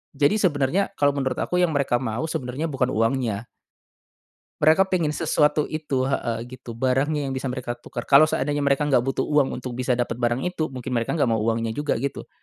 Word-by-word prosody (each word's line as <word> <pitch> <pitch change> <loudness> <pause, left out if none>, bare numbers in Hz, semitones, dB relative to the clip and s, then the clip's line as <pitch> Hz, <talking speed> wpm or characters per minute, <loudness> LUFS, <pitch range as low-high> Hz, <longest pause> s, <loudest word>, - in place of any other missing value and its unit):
Jadi 145 +8 +3
sebenarnya 170 +2 +1
kalo 145 -1 +3
menurut 135 -2 -1
aku - - -2
yang 175 -2 +3
mereka 140 -3 +2
mau 115 +7 -2
sebenarnya 130 +3 -3
bukan 130 -4 -1
uangnya. 115 -2 0 1.1
Mereka 175 +6 +4
pingin 170 -4 +2
sesuatu 150 -1 +1
itu 150 -4 -2
heeh, 120 -4 -2
gitu 125 -2 -10
barangnya 135 +4 +1
yang 135 - -3
bisa 130 0 -3
mereka 125 -1 -3
tukar 120 0 -6
kalo 150 +3 +6
seandainya 145 +1 -1
mereka 140 +1 +2
enggak 140 -4 +3
butuh 135 +2 -1
uang 145 -3 +1
untuk 125 0 -6
bisa 125 0 0
dapat 120 0 -2
barang 120 +2 0
itu 170 -3 -2
mungkin 130 -1 -6
mereka 120 +6 0
enggak 130 -7 +2
mau 110 - +1
uangnya 115 +1 0
juga 145 +6 -1
gitu. 135 +4 -4
135 Hz, 195 wpm, -24 LUFS, 125-150 Hz, 1.1 s, kalo